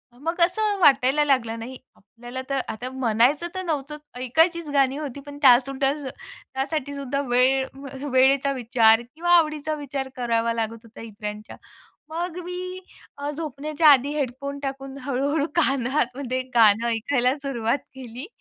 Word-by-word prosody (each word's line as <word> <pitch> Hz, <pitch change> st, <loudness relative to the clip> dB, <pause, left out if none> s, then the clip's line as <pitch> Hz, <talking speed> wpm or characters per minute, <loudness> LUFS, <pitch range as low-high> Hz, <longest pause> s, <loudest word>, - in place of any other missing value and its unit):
अ, -, -, -20 dB
मग 330 Hz, +5 st, -3 dB
असं 405 Hz, +3 st, +2 dB
वाटायला 275 Hz, -1 st, +4 dB
लागलं, 230 Hz, -5 st, +1 dB
नाही 255 Hz, +3 st, -7 dB, 0.2 s
आपल्याला 240 Hz, +5 st, -9 dB
तर 275 Hz, -1 st, 0 dB
आता 245 Hz, +4 st, -5 dB
म्हणायचं 260 Hz, +5 st, +2 dB
तर 375 Hz, -, -3 dB
नव्हतं, 300 Hz, -2 st, -3 dB, 0.2 s
ऐकायचीच 325 Hz, +6 st, +2 dB
गाणी 275 Hz, -1 st, +2 dB
होती, 285 Hz, -3 st, -6 dB
पण 285 Hz, 0 st, -8 dB
त्यासुद्धा 270 Hz, +1 st, +4 dB, 0.6 s
त्यासाठी 285 Hz, +1 st, -3 dB
सुद्धा 280 Hz, 0 st, -2 dB
वेळ 260 Hz, +2 st, +4 dB
व 275 Hz, +1 st, -10 dB, 0.2 s
वेळेचा 270 Hz, +2 st, +4 dB
विचार 230 Hz, -2 st, +4 dB
किंवा 345 Hz, +2 st, -1 dB
आवडीचा 310 Hz, -1 st, 0 dB
विचार 275 Hz, -2 st, -5 dB
करावा 230 Hz, -2 st, 0 dB
लागत 230 Hz, 0 st, -3 dB
होता 230 Hz, -1 st, -13 dB
इतरांच्या. 210 Hz, -1 st, -8 dB, 0.5 s
मग 340 Hz, +1 st, -4 dB
मी 365 Hz, +1 st, -6 dB, 0.4 s
अ, 285 Hz, +1 st, -3 dB
झोपण्याच्या 305 Hz, +1 st, 0 dB
आधी 275 Hz, -1 st, +5 dB
हेडफोन 280 Hz, 0 st, -3 dB
टाकून, 270 Hz, -1 st, -6 dB
हळू-हळू 280 Hz, +3 st, 0 dB
कानामध्ये 260 Hz, -3 st, 0 dB
गाणं 225 Hz, 0 st, +5 dB
ऐकायला 250 Hz, +3 st, +1 dB
सुरुवात 270 Hz, -3 st, -1 dB, 0.2 s
केली, 255 Hz, +2 st, -8 dB
270 Hz, 140 wpm, -24 LUFS, 245-295 Hz, 0.6 s, आधी